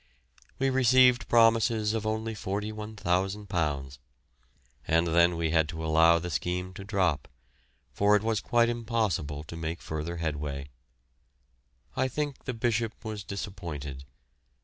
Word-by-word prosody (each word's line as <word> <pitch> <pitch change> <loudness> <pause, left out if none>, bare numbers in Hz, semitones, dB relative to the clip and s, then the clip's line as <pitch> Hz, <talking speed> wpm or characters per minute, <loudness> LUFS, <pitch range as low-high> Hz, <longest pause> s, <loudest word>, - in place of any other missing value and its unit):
We 135 0 +1
received 130 -1 +5
promises 115 -2 +4
of 110 -1 -2
only 110 +1 -2
£41,000, 95 -8 -2 0.9
and 85 +1 +3
then 85 +1 +3
we 80 -1 0
had 80 -2 +2
to 80 -1 -5
allow 80 +1 +5
the 90 +1 -4
scheme 90 +2 -2
to 95 - -8
drop, 95 -8 0 0.7
for 100 +6 +4
it 105 - +1
was 110 -2 0
quite 120 -1 +3
impossible 110 -11 -1
to 80 - -9
make 80 +1 -4
further 80 +2 -5
headway. 75 -3 -3 1.3
I 130 0 +1
think 145 +1 -4
the 130 - -2
Bishop 115 -1 -1
was 110 -2 -5
disappointed. 85 -9 -6
95 Hz, 125 wpm, -28 LUFS, 80-110 Hz, 1.3 s, received